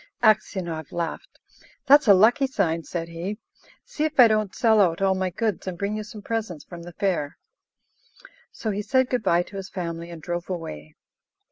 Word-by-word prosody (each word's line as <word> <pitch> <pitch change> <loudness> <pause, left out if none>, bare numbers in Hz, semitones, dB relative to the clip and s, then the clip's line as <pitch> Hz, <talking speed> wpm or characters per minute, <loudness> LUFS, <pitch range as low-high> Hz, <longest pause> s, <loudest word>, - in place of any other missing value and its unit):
Aksionov 180 -7 +1
laughed. 170 - -5 0.5
"That's 285 -1 +6
a 200 - +8
lucky 240 +8 +4
sign," 165 -10 0
said 165 0 -4
he. 175 +5 -5 0.5
"See 300 - -4
if 310 -3 -2
I 245 - +10
don't 215 -3 0
sell 220 -4 +4
out 165 -4 +2
all 195 -1 +3
my 190 0 -1
goods, 210 +1 -2
and 180 -2 -4
bring 200 +3 -2
you 215 - -3
some 210 0 -11
presents 215 -9 -4
from 175 -1 -10
the 175 +1 -10
fair." 170 -8 -1 1.1
So 220 - -4
he 205 +1 -2
said 260 +3 +1
good 250 -2 +1
bye 175 -4 +2
to 195 - -10
his 190 -1 -6
family, 170 -2 -5
and 170 -1 -8
drove 175 +3 -5
away. 75 - -6
190 Hz, 190 wpm, -24 LUFS, 170-220 Hz, 1.1 s, I